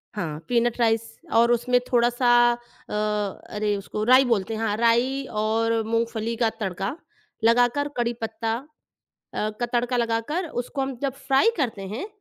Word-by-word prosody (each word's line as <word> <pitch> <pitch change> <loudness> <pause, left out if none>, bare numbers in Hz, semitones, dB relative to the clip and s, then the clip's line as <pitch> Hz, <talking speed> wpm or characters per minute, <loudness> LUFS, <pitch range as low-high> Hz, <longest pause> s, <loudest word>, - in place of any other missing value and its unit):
हाँ, 160 -7 -3
peanut 240 0 +1
rice 225 -1 +3 0.3
और 235 +1 +5
उसमें 245 +1 +3
थोड़ा-सा 240 0 +3 0.2
अ, 240 0 -13 0.6
अरे 210 0 0
उसको 210 +2 -4
राई 255 +4 +6
बोलते 225 -3 0
हैं 220 - -4
हाँ, 215 -2 0
राई 240 +4 +2 0.2
और 225 +1 +1
मूँगफली 230 0 -1
का 225 - +4
तड़का 195 +3 -3 0.5
लगाकर, 245 +5 +3
कड़ी 240 0 0
पत्ता 225 0 -2 0.6
अ, 215 - -4
का 240 - +1
तड़का 245 +1 +1
लगाकर 235 +9 -1
उसको 270 +3 -4
हम 265 -1 -3
जब 275 -1 0
फ्राइ 270 +12 +4
करते 235 -9 -2
हैं, 225 - -4
235 Hz, 150 wpm, -24 LUFS, 225-245 Hz, 0.6 s, राई